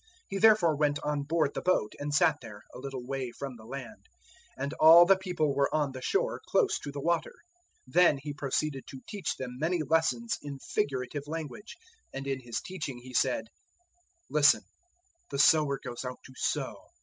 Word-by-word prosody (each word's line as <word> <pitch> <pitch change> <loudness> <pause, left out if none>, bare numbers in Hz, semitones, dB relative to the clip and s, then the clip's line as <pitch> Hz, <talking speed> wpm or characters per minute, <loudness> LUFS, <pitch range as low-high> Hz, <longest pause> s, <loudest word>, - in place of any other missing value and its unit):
He 195 - -3
therefore 210 -8 +5
went 145 0 +1
on 150 -1 -1
board 150 0 0
the - - -3
boat 180 -12 +1
and 145 +1 -3
sat 155 0 +3
there, 105 -4 -11
a - - -9
little 130 -2 -6
way 135 -1 -3
from 135 +1 -7
the 110 -2 -14
land; 120 -5 -9 0.5
and 140 +2 -3
all 165 +2 +9
the 195 +2 +6
people 180 -6 -1
were 140 0 +1
on 150 -3 0
the 130 -1 -8
shore 420 - 0
close 455 -6 +2
to 145 - -7
the 140 - -6
water. 170 +3 -1 0.5
004:002 130 - -18
Then 175 -4 +5
He 145 +2 -6
proceeded 140 -1 -2
to 135 - -10
teach 205 -3 -3
them 125 -1 -7
many 165 +1 0
lessons 165 +10 +1
in 145 -1 -7
figurative 135 +1 -3
language; 160 - -6 0.3
and 135 0 -6
in 135 -1 -2
His 120 -3 -4
teaching 155 -8 -6
He 125 +1 -12
said, 125 -2 +1
004:003 - - -18 0.9
"Listen: 150 0 +5 0.7
the 140 - -4
sower 145 -1 +4
goes 120 -1 -7
out 125 0 -5
to 130 - -13
sow. - - -2
145 Hz, 190 wpm, -29 LUFS, 130-160 Hz, 0.9 s, all